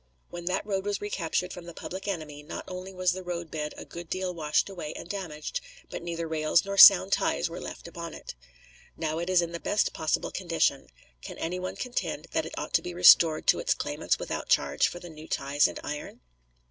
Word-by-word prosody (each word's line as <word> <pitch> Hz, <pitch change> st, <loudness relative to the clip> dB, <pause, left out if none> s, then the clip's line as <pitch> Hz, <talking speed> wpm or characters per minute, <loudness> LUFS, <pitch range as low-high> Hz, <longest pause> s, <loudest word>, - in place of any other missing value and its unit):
When 175 Hz, 0 st, -7 dB
that 185 Hz, +2 st, -1 dB
road 195 Hz, -2 st, -1 dB
was 205 Hz, 0 st, -2 dB
recaptured 180 Hz, -3 st, -2 dB
from 175 Hz, -, -9 dB
the 170 Hz, -, -9 dB
public 190 Hz, +2 st, -7 dB
enemy 155 Hz, -6 st, -4 dB
not 150 Hz, -, -7 dB
only 185 Hz, +1 st, -7 dB
was 185 Hz, -1 st, +1 dB
the 185 Hz, +1 st, -4 dB
roadbed 170 Hz, -4 st, -4 dB
a -, -, -8 dB
good 170 Hz, -1 st, -9 dB
deal 185 Hz, -1 st, -2 dB
washed 155 Hz, -3 st, +1 dB
away 175 Hz, -6 st, -6 dB
and -, -, -8 dB
damaged, 180 Hz, -, -4 dB, 0.3 s
but -, -, -5 dB
neither 170 Hz, -1 st, -4 dB
rails 160 Hz, +2 st, +2 dB
nor 200 Hz, 0 st, -3 dB
sound 195 Hz, -1 st, +9 dB
ties 170 Hz, -, +1 dB
were 170 Hz, -, -6 dB
left -, -, -8 dB
upon 170 Hz, -1 st, -7 dB
it. -, -, -8 dB, 0.6 s
Now 160 Hz, 0 st, -2 dB
it 170 Hz, +2 st, -3 dB
is 180 Hz, -2 st, +4 dB
in 170 Hz, -, -4 dB
the 170 Hz, -, -5 dB
best 205 Hz, -, +1 dB
possible 155 Hz, -, -1 dB
condition. 165 Hz, -6 st, 0 dB, 0.3 s
Can -, -, -8 dB
any 180 Hz, +3 st, -3 dB
one 185 Hz, 0 st, -4 dB
contend 250 Hz, -1 st, -3 dB
that -, -, 0 dB
it -, -, -9 dB
ought -, -, -5 dB
to -, -, +4 dB
be 175 Hz, -1 st, -6 dB
restored 170 Hz, -3 st, +7 dB
to -, -, +5 dB
its -, -, +1 dB
claimants -, -, -1 dB
without -, -, -5 dB
charge 70 Hz, +1 st, +3 dB
for 175 Hz, -, -6 dB
the 175 Hz, -, -10 dB
new 155 Hz, -1 st, -11 dB
ties 140 Hz, +1 st, +2 dB
and -, -, -6 dB
iron? 150 Hz, 0 st, -6 dB
170 Hz, 215 wpm, -28 LUFS, 160-185 Hz, 0.6 s, sound